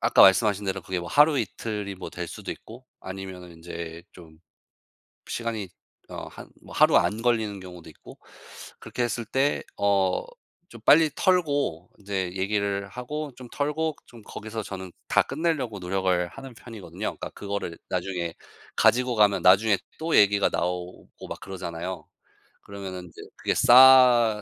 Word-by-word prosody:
아까 115 +1 +5
말씀하신 100 +1 +5
대로 95 0 -3
그게 90 +1 -3
뭐 85 - -7
하루 150 0 +5
이틀이 105 -1 -4
뭐 95 - -8
될 85 -1 -5
수도 - - -7
있고 120 +3 -13 0.2
아니면은 95 -1 -8
인제 85 0 -8
좀 80 -3 -15 0.9
시간이 115 -5 -4 0.4
어 - - -7
한 - - -12
뭐 - - -13
하루 - - +5
안 110 +2 +1
걸리는 110 -4 0
경우도 90 -3 -11
있고 - - -15 0.6
그렇게 125 - -4
했을 120 -1 -2
때 135 +5 0
어 100 -2 +1 0.4
좀 115 -2 -13
빨리 155 +4 +5
털고 145 - +1
인제 95 -3 -3
얘기를 100 +1 -1
하고 145 +6 -5
좀 125 -1 -10
털고 150 +2 -1
좀 115 -3 -15
거기서 110 +1 -7
저는 95 -2 -7 0.2
다 - - +4
끝내려고 140 -8 -2
노력을 90 -1 0
하는 135 -2 -11
편이거든요. 115 -5 -12
그러니까 - - -4
그거를 100 -4 -5
나중에 90 -2 -3 0.4
가지고 125 +1 +3
가면 105 -2 +3
나중에 95 +2 +5 0.2
또 160 +1 0
얘기가 100 -1 +5
나오고 90 0 -5
막 - - -6
그러잖아요. 90 -2 -6 0.6
그러면은 95 -2 -7
인제 85 - -13
그게 - - -1
싸 125 -4 +7
100 Hz, 315 characters per minute, -25 LUFS, 95-120 Hz, 0.9 s, 싸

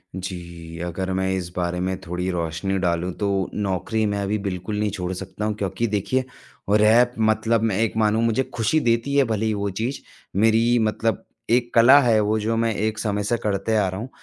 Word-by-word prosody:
जी, 85 -3 -7
अगर 95 +2 -3
मैं 95 0 0
इस 90 -2 -3
बारे 90 0 -1
में 95 +1 -2
थोड़ी 90 +1 -3
रोशनी 85 +3 -2
डालूँ 90 0 0
तो 100 - -1 0.3
नौकरी 105 +2 -1
मैं 100 -1 -1
अभी 100 +2 -1
बिल्कुल 95 +3 -3
नहीं 105 -1 +1
छोड़ 90 -2 -4
सकता 95 +3 -5
हूँ, 110 - 0
क्योंकि 100 +3 -2
देखिए 110 +6 0 0.5
रैप 110 +4 +5
मतलब 110 +1 +2
मैं 105 -4 +1
एक 110 -1 0
मानू 110 +1 +2
मुझे 115 +3 +2
खुशी 120 +7 +1
देती 115 +2 0
है 140 - +5
भले 110 -1 -1
ही 110 - +1
वो 100 0 -2
चीज़, 115 +8 -3 0.4
मेरी 115 +3 +3
मतलब 110 -1 0 0.3
एक 120 0 +1
कला 130 +5 +8
है 115 -4 +3
वो 110 +1 +1
जो 115 +2 -1
मैं 115 -1 +1
एक 110 +1 -1
समय 105 -2 -1
से 120 +3 0
करते 105 +2 0
आ 100 -3 +2
रहा 95 +2 -5
हूँ। 125 - -6
105 Hz, 200 wpm, -23 LUFS, 95-115 Hz, 0.5 s, कला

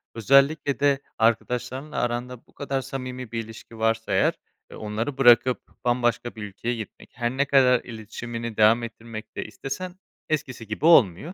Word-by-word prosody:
Özellikle 140 +5 +3
de 140 -1 +3 0.2
arkadaşlarınla 125 +5 -1
aranda 120 0 -3
bu - - -25
kadar 135 -1 -3
samimi 130 -2 -6
bir 115 -1 -2
ilişki 115 +1 -12
varsa 115 -1 0
eğer 95 - +3 0.4
e - - -11
onları 110 +6 -4
bırakıp 125 -1 +5 0.2
bambaşka 120 -1 0
bir 110 - -7
ülkeye 105 +4 -4
gitmek, 110 -2 -9
her 120 -1 -1
ne 140 - +3
kadar 130 -3 +4
iletişimini 115 0 -7
devam 110 +2 +5
ettirmek 115 -1 -9
de - - -4
istesen 155 +11 -6 0.3
eskisi 130 -7 -3
gibi 110 +8 -3
olmuyor. 140 - +5
120 Hz, 155 wpm, -25 LUFS, 115-135 Hz, 0.4 s, bırakıp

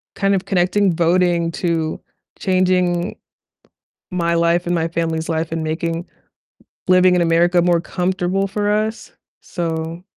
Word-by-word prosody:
kind 195 -1 +1
of 185 - -2
connecting 185 0 +2
voting 170 0 +2
to 165 -3 -2 0.4
changing 185 -1 +1 1.0
my 170 -2 0
life 170 +1 +1
and 175 - 0
my 165 0 0
family's 165 -1 -2
life, 160 0 -2
and 165 -1 -2
making 165 +2 -2 0.8
living 185 0 +5
in 175 - +2
America 170 +1 +3
more 175 -1 +2
comfortable 185 +2 -1
for 205 +1 -2
us, 215 +1 -2 0.3
so 165 0 -4
175 Hz, 130 wpm, -19 LUFS, 165-185 Hz, 1.0 s, living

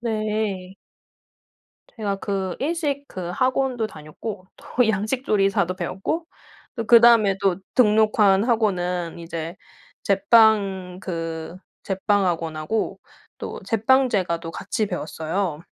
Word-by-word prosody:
네. 215 -4 -2 1.2
제가 205 -4 -2
그 195 -2 -3
일식 290 -2 -1
그 180 -3 -6
학원도 255 +1 0
다녔고 185 +5 -8
또 245 -2 0
양식 220 +5 -1
조리사도 195 -3 +1
배웠고 195 - -3 0.5
또 230 - -3
그다음에 230 -4 +6
또 195 -3 +2 0.2
등록한 210 -3 +4
학원은 180 -8 0
이제 165 0 -6 0.5
제빵 195 -3 +3
그 165 -2 -5 0.3
제빵 200 +1 +1
학원하고 165 +3 -2 0.4
또 - - -6
제빵 255 +4 +3
제과도 170 -6 -1
같이 215 - -2
배웠어요. 160 -1 -3
200 Hz, 220 characters per minute, -23 LUFS, 180-225 Hz, 1.2 s, 그다음에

